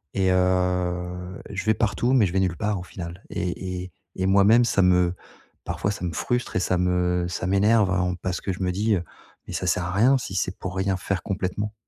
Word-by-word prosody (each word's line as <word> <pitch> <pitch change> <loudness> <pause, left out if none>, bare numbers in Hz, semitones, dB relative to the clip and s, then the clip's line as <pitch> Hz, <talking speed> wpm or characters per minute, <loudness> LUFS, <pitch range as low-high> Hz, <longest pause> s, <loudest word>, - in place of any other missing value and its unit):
et 95 -1 +2
heu, 90 0 0
je 100 -1 -4
vais 110 - +3
partout, 120 +3 0
mais 125 -6 +5
je 90 - -2
vais 95 - +2
nulle 90 -3 0
part, 105 -3 -1
au - - -7
final, 90 0 -8
et 90 +1 -3
et 95 - -10 0.3
et 95 - +1
moi-même, 100 +5 +5
ça 100 - +2
me 90 -1 +4 0.5
parfois, 100 - -2
ça 95 -3 -5
me 85 - -3
frustre 120 +9 -2
et - - +3
ça 90 0 +1
me 90 -1 +1
ça 90 - -3
m'énerve 100 +1 +3
à 95 -1 +2
on 90 0 0
parce 90 0 -4
que, 95 - -2
je 95 - -4
me 90 - +1
dis, 105 +3 +1
heu: 90 - -2 0.4
«Mais - - -7
ça - - -2
sert 90 - +1
à 90 - -3
rien 120 +8 +4
si 95 -6 -6
c'est 90 0 -1
pour 95 0 -5
rien 95 0 0
faire 95 -1 -3
complètement». 100 +2 -3
95 Hz, 230 wpm, -24 LUFS, 90-100 Hz, 0.5 s, mais